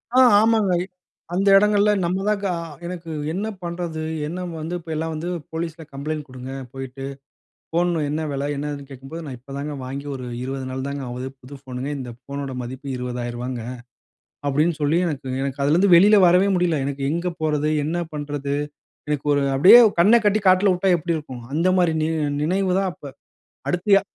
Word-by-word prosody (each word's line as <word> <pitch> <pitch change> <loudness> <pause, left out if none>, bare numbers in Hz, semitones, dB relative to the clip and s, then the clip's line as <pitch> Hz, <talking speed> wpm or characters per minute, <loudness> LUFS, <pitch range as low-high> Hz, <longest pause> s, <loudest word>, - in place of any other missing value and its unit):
ஆ, - - +7 0.2
ஆமாங்க. 220 -4 +3
இ - - -3 0.5
அந்த 195 +3 +1
இடங்கள்ல 210 0 +4
நம்ம 185 +3 -1
தாங்க 205 -1 0
அ - - -4 0.3
எனக்கு 170 -1 -6 0.2
என்ன 195 +6 -2 0.2
பண்றது? 170 -2 -4 0.3
என்ன 180 +4 -4 0.2
வந்து, 160 +3 -4
இப்போ 165 -1 -9
எல்லாம் 160 +1 -2
வந்து 160 +3 -4 0.2
போலீஸ்ல 165 0 -4
கம்ப்ளைண்ட் 150 +2 -4
குடுங்க 130 0 -8 0.2
போயிட்டு. 135 0 -7 0.7
ஃபோன் 175 +2 +2 0.2
என்ன 155 +2 -1
விலை? 140 0 -2
என்னதுன்னு 145 0 -4
கேக்கும்போது 135 +5 -8
"நான் 135 -4 -6
இப்பதாங்க 140 +4 -6
வாங்கி 140 +2 -6
ஒரு 130 -1 -6 0.2
20 135 0 -4
நாள் 130 +1 -4
தாங்க 140 0 -4
ஆகுது. 125 +1 -5
புது 135 +3 -11
ஃபோனுங்க. 130 +1 -5
இந்த 125 -2 -6
ஃபோனோட 140 -1 -5
மதிப்பு 130 +3 -7
ரூ.20,000ங்க" 125 0 -4 0.9
அப்டீன்னு 150 +4 +1
சொல்லி 150 +3 +2
எனக்கு 145 -5 -4 0.2
எனக்கு 140 0 -3
அதிலேந்து 175 +7 +4
வெளியில 205 +5 +7
வரவே 180 +3 +5
முடியல. 175 -3 +1
எனக்கு 140 0 -4
எங்க 170 +3 -1
போறது? 150 -1 +1
என்ன 160 +3 -1 0.2
பண்றது? 145 -1 -3 0.5
எனக்கு 150 -1 -2
ஒரு 145 - +2 0.2
அப்டீயே 185 - +9 0.2
கண்ண 210 +7 +7
கட்டி 210 +1 +3
காட்டுல 185 +2 +5
வுட்டா 185 +2 +1
எப்டி 170 +1 -2
இருக்கும், 130 -6 -7
அந்த 165 +4 +2
மாரி 175 -2 +3
நியோ 160 +1 0 0.3
நினைவுதான் 190 +3 +1
அப்ப. 180 - -23 0.7
அடுத்து, 180 +3 -2
எ - - -7
155 Hz, 170 wpm, -22 LUFS, 135-175 Hz, 0.9 s, அப்டீயே